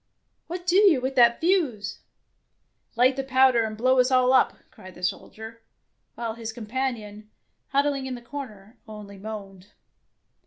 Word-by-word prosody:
" - - -49
What 355 +1 -6
do 365 +1 +3
you 390 -9 +5
with 260 +2 -3
that 235 -1 +5
fuse? 290 - 0 1.0
"Light 250 +3 +4
the 270 - -1
powder 260 -3 +4
and 215 -1 -4
blow 255 +3 +3
us 250 0 +4
all 255 0 +3
up," 260 - +3
cried 185 -1 -14
the 180 - -14
soldier, 220 +4 -5 0.5
while 230 -1 -4
his 225 -1 -6
com 225 0 -9
panion, 215 -4 -4 0.4
huddling 280 -1 0
in 255 - -4
the 240 - -10
corner, 235 -5 -9
only 210 -2 -10
moaned. 195 -2 -9
240 Hz, 160 wpm, -25 LUFS, 215-265 Hz, 1.0 s, you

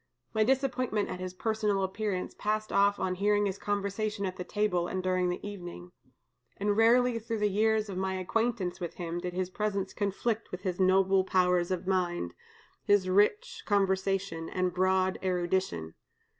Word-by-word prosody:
My 220 -1 +3
disappointment 255 -3 0
at 180 - -5
his 185 0 -5
personal 210 -1 0
appearance 190 -1 -2
passed 215 0 -2
off 200 +1 +3
on 185 -1 0
hearing 205 +2 +2
his 195 -1 -2
conversation 205 0 -2
at 185 -1 -3
the 180 - -5
table 180 -4 0
and 185 0 -3
during 185 -1 +1
the 180 +3 -4
evening; 175 -3 -8 0.7
and 205 +1 +1
rarely 235 +2 +4
through 225 0 -3
the 210 0 +2
years 215 +1 +2
of 190 -2 -4
my 190 0 -1
acquaintance 200 0 -1
with 175 -3 -5
him 170 -1 -4
did 180 0 -4
his 185 0 -2
presence 200 -1 -2
conflict 210 +3 -1
with 180 - -6
his 185 -1 -2
noble 190 0 +4
powers 180 -2 +2
of 185 -1 -2
mind, 175 - -1 0.5
his 205 -2 +3
rich 205 +2 +2
conversation, 195 -4 0
and 185 -1 -1
broad 185 +1 +2
erudition. 175 - -1
190 Hz, 165 wpm, -30 LUFS, 185-210 Hz, 0.7 s, rarely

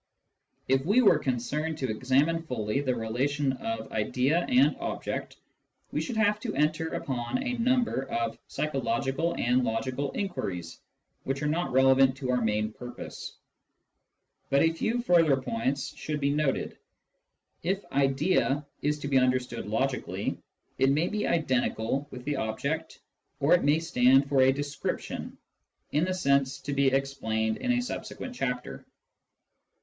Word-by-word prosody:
If 135 0 +2
we 210 - +4
were 175 -8 +6
concerned 150 +5 -2
to 130 -6 -2
examine 135 +8 +2
fully 125 -4 -2
the 130 -3 0
relation 135 +5 0
of 115 -3 -5
idea 130 +10 +1
and 255 +2 +4
object, - - -4 0.5
we - - -1
should 240 -4 -4
have 210 -1 +3
to 225 0 -4
enter 155 +2 +1
upon 125 - -2
a 250 -2 -2
number 240 - +1
of 115 -1 -2
psychological 135 +2 -1
and 125 +2 +2
logical 130 +5 -1
inquiries, 90 - -4 0.4
which 135 +2 -2
are - - +1
not 165 +4 0
relevant 130 0 +5
to 130 -3 -2
our 125 -1 +1
main 105 -1 0
purpose. 120 +1 -8 1.1
But 140 - +4
a 165 0 +3
few 235 +8 -1
further 165 - +4
points 130 +2 -2
should 150 -1 -4
be 140 0 +1
noted. 145 -2 -1 0.8
If 190 +4 -1
" - - -24
idea 140 +1 +1
" - - -42
is 150 +1 0
to 145 - -3
be 135 -2 +4
understood 130 0 0
logically, - - -2 0.4
it 135 - +4
may 155 +5 +2
be 210 0 -1
identical 130 -3 0
with 125 -2 -9
the 145 -1 -1
object, 140 +9 -3 0.4
or 140 +2 +4
it 180 - +4
may 145 +2 +4
stand 135 -4 +4
for 140 -1 +3
a 130 0 +6
description 145 +1 -4 0.5
(in 150 +4 +2
the 185 - -1
sense 140 -5 +2
to 140 +1 -4
be 140 0 +3
explained 120 -5 0
in 250 - -1
a 245 0 +1
subsequent 250 +1 -6
chapter). 125 - -3
140 Hz, 150 wpm, -28 LUFS, 125-160 Hz, 1.1 s, were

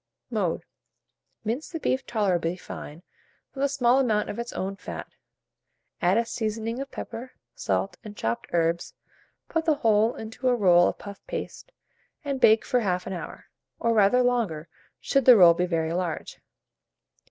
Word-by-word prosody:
Mode. - - -1 0.8
Mince 235 +8 -3
the 325 - -5
beef 265 -3 -1
tolerably 180 -6 0
fine 165 -2 -9 0.5
with 275 - -3
a 280 - +3
small 260 -2 +3
amount 220 -5 +1
of 205 - -7
its 235 0 -4
own 195 +1 -3
fat; - - -7 1.0
add - - +3
a 230 - +2
seasoning 225 +1 -3
of 275 0 -5
pepper, 240 +1 -7 0.2
salt, - - -2
and 210 -2 -10
chopped 115 +1 -2
herbs; 170 0 0 0.5
put 325 -1 -1
the 315 -2 +3
whole 225 -2 +2
into 225 +4 -5
a 250 - +4
roll 175 -5 +5
of - - -2
puff 200 -1 -10
paste, - - -6 0.5
and 275 -2 -2
bake 220 0 +5
for 250 - +2
1/2 185 -4 -1
hour, 175 -3 -7 0.3
or 230 0 +1
rather 220 +4 +4
longer, 215 -11 0 0.3
should 275 -2 +1
the 250 -3 +9
roll 175 -3 +8
be 180 +2 -1
very 165 -2 -1
large. 175 -2 -3
220 Hz, 160 wpm, -26 LUFS, 180-250 Hz, 1.0 s, the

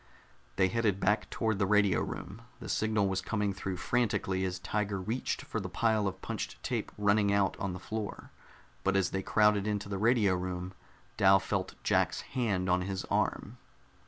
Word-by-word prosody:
They 95 0 +4
headed 105 -2 +1
back 105 +3 +1
toward 110 -3 -1
the 100 - +2
radio 100 -2 +3
room. 100 +4 -6 0.2
The - - -8
signal 110 -2 +1
was 95 -1 -1
coming 105 -2 -1
through 95 -1 -4
frantically 95 -2 0
as 90 0 -2
Tiger 100 +2 -2
reached 110 +7 -2
for 115 - -3
the 95 -2 -5
pile 110 +2 +1
of 95 0 -5
punched - - -4
tape - - -2
running 105 0 +3
out 100 -1 +2
on 95 -2 -2
the 90 - -6
floor. 105 +3 -5 0.5
But 100 0 +1
as 95 -1 +2
they 95 - -1
crowded 105 0 +3
into 105 -1 -2
the 100 -1 -3
radio 110 -3 +3
room, 90 0 -3 0.4
Dal 95 0 +6
felt 95 -1 -3
Jack's - - +2
hand 105 -8 0
on 90 0 +2
his 95 0 -3
arm. - - -1
100 Hz, 180 wpm, -31 LUFS, 95-105 Hz, 0.5 s, Dal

